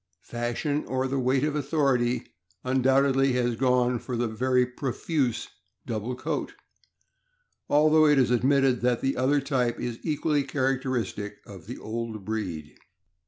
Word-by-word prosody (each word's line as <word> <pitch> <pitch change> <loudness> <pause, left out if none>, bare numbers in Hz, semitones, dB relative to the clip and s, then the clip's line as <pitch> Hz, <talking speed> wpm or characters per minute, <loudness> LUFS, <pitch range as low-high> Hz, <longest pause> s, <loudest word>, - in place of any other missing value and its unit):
Fashion, 120 +5 -2
or 130 0 -1
the 135 +1 -1
weight 130 +1 +1
of 150 0 0
authority, 135 -5 +1 0.4
undoubtedly 135 +1 +3
has 120 -1 0
gone 125 0 +2
for 125 +1 -5
the 120 0 0
very 125 +3 +1
profuse 130 +1 -2 0.4
double 115 +2 -3
coat, - - -4 1.1
although 155 +1 +5
it 150 -1 +4
is 125 -2 +3
admitted 130 +1 +3
that 120 -1 +1
the 135 0 0
other 135 +3 +2
type 130 -4 -1
is 120 -1 -4
equally 150 -1 0
characteristic 130 -7 -2
of 95 -3 -12
the 125 - -6
old 110 -2 -5
breed. 90 -9 -4
125 Hz, 135 wpm, -26 LUFS, 120-135 Hz, 1.1 s, although